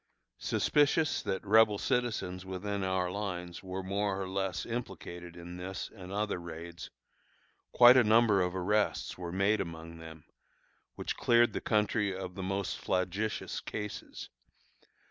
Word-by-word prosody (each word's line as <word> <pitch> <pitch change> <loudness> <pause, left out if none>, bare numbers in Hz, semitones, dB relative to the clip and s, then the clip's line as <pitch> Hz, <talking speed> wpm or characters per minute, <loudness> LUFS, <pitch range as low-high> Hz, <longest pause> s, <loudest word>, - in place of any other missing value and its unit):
Suspicious 150 +2 +2
that 95 +2 -3
Rebel 105 0 +5
citizens 110 -8 -1
within 95 +1 -3
our 95 -1 0
lines 90 -3 -4
were 95 0 -5
more 100 +1 -1
or 95 - -3
less 95 -1 -2
implicated 90 -7 -6
in 85 +1 -8
this 95 +2 -5
and 95 -2 -9
other 105 -2 -1
raids, 85 0 -8 0.8
quite 120 +1 +8
a 125 - +7
number 110 -2 +5
of 90 0 -1
arrests 105 +3 0
were 90 -2 -6
made 100 +3 +2
among 85 -2 -7
them, 80 -1 -11 0.7
which - - -4
cleared 120 0 +4
the - - -3
country 105 -2 +1
of 90 -1 -6
the 95 - -6
most 95 0 -2
flagitious 95 +4 -1
cases. 105 -1 -6
95 Hz, 140 wpm, -31 LUFS, 90-105 Hz, 0.8 s, quite